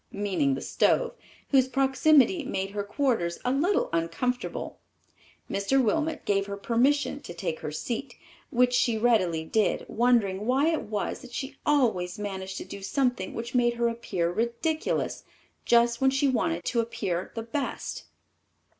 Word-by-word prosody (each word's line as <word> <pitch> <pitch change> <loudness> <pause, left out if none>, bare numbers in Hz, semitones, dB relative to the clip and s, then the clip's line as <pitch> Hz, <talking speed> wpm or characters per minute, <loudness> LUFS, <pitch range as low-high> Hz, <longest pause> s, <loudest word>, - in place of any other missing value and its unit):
meaning 185 -9 0
the 135 - -5
stove, - - +1 0.4
whose 265 -2 +4
proximity 275 +4 +3
made 195 -7 -3
her 205 0 -3
quarters 205 -7 0
a 250 - +2
little 335 +9 +2
uncomfortable. 170 +10 -2 0.7
Mr. 200 +7 +1
Wilmot 315 +6 0
gave 195 -1 +1
her 200 0 -5
permission 265 +7 +1
to 175 - -9
take 165 -1 -3
her 150 - -5
seat, 240 - -4 0.3
which 245 +1 +3
she 235 -2 +2
readily 195 -9 +2
did, 215 +5 +1
wondering 215 -4 +2
why 270 +5 +3
it 325 - 0
was 210 -1 -3
that 245 -1 -12
she 270 +3 -5
always 220 -12 +2
managed 190 -2 -5
to - - -6
do 200 - -8
something 245 -1 -1
which 235 +1 -5
made 240 -1 +3
her 235 0 +1
appear 190 -7 -2
ridiculous, 235 - -1 0.4
just 235 0 +3
when 265 - +5
she 270 +1 +2
wanted 270 +6 0
to 240 - 0
appear 190 -6 -2
the 225 - -3
best. 265 +5 -4
235 Hz, 155 wpm, -27 LUFS, 195-270 Hz, 0.7 s, when